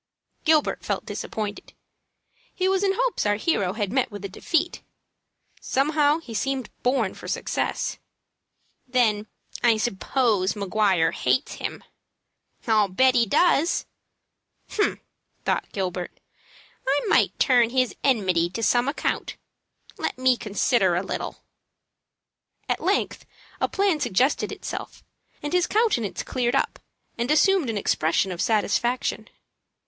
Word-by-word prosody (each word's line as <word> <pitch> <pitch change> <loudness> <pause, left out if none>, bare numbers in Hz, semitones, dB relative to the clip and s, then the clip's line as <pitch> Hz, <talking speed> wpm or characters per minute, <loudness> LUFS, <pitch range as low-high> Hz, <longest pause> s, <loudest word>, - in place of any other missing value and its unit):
Gilbert 315 -2 +2
felt - - -2
disappointed. 210 -1 -5 0.8
He 370 - +1
was 385 +1 +2
in 390 -1 +3
hopes - - 0
our 205 - +3
hero 205 - 0
had 205 -2 -2
met 260 -1 +1
with 205 -2 -8
a - - -4
defeat. 330 - -1 0.8
Somehow 295 +2 +2
he 290 -9 -10
seemed 260 +2 -2
born 245 -6 +1
for - - -10
success. - - -2 0.9
"Then 220 -4 +1 0.3
I 230 -2 +4
suppose 215 -2 +1
Maguire 200 -4 +2
hates 260 - 0
him?" - - -5 0.8
"I'll 215 -3 +3
bet 255 +8 +3
he 235 -2 +3
does." 335 - +3 0.9
"Humph!" 415 - 0 0.4
thought - - -1
Gilbert; 180 -2 -4 0.7
"I 275 +2 +3
may - - +5
turn 245 -4 +4
his 255 0 +1
enmity 185 -10 +2
to 230 - -3
some 240 +3 +3
account. 280 - -2 0.6
Let - - -2
me 255 0 +4
consider 205 -3 +1
a 180 - 0
little." - - -5 1.2
At - - -1
length - - 0 0.4
a - - +2
plan 390 -5 +1
suggested 265 +1 +1
itself, - - -7 0.4
and 295 - -3
his 360 -1 +3
countenance 410 - +1
cleared 250 0 -1
up, - - 0 0.4
and 240 +2 -1
assumed 320 -1 +4
an 220 - -2
expression 185 0 +1
of 175 - -4
satisfaction. 235 +3 0
240 Hz, 125 wpm, -24 LUFS, 205-285 Hz, 1.2 s, may